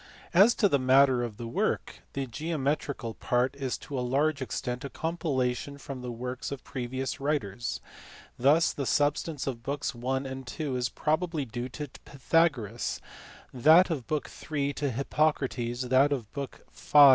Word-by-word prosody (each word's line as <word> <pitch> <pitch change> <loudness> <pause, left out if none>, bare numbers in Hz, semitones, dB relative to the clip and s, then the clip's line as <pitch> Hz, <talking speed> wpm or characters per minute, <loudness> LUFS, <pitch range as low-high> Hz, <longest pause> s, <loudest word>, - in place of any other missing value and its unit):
As 200 +7 +7
to 210 - +4
the 140 -7 +2
matter 130 0 +5
of 115 -4 -4
the 120 - -6
work. 115 - -1
The 135 -1 -2
geometrical 140 -3 -2
part 125 +4 0
is 135 -2 -2
to 140 -3 -5
a - - 0
large 140 +4 +1
extent 125 0 -3
a 140 - -4
compilation 140 -5 -1
from 135 -2 -7
the 125 -1 -4
works 125 +3 -5
of 140 - -5
previous 130 +1 -4
writers. 125 -7 -1 0.6
Thus 150 +7 +4
the 140 -3 -3
substance 145 0 +1
of 125 -4 -3
books 140 +3 -2
I. 125 +3 -1
and 135 - -4 0.3
n. 145 -4 -1
is 125 0 0
probably 155 -1 0
due 120 +2 -5
to 150 +3 -5 0.2
Pythagoras; 135 -6 +1 0.5
that 160 +8 +6
of 135 -8 -3
book 150 -1 -1 0.2
in. 145 -2 0
to 145 0 -1
Hippocrates; 130 -2 0
that 135 +3 +5
of 120 -7 -2
book 140 -2 -6
v. 150 - +3
135 Hz, 160 wpm, -29 LUFS, 125-150 Hz, 0.6 s, As